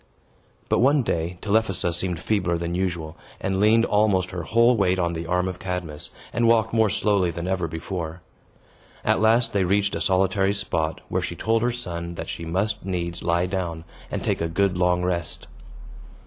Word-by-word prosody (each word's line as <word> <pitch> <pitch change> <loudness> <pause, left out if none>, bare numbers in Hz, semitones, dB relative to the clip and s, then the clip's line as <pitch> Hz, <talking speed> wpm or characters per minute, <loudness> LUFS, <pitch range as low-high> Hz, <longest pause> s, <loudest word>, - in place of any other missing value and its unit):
But, - - +2
one 135 +3 +4
day, 85 -3 -2
Telephassa 100 -5 +1
seemed 85 -1 -1
feebler 90 -5 0
than 85 0 -3
usual, 85 -3 -2 0.2
and 95 0 -1
leaned 110 +3 +5
almost 100 -3 +2
her 90 -2 -4
whole 115 +8 +4
weight 95 -3 +2
on 85 -2 0
the 80 0 -5
arm 90 +1 +1
of 90 -1 -5
Cadmus, 90 -5 -4 0.2
and 120 -1 +2
walked 110 -1 +3
more 110 -2 +4
slowly 100 -3 +2
than 85 +1 -4
ever 95 -2 0
before. 85 +1 -5 0.8
At - - +2
last 115 +2 +3
they 100 -2 +2
reached 100 +2 +1
a - - -2
solitary 95 +1 +2
spot, 85 -5 -2
where - - 0
she - - -4
told 115 0 +1
her 120 +1 +2
son 85 -8 -5
that - - -6
she 85 - -5
must 100 +6 -1
needs 85 -2 -3
lie 85 +1 +1
down, 90 -3 -3 0.3
and - - -3
take - - 0
a 85 - -1
good 95 +2 +1
long 90 0 +2
rest. 85 -2 -2
95 Hz, 185 wpm, -24 LUFS, 85-105 Hz, 0.8 s, leaned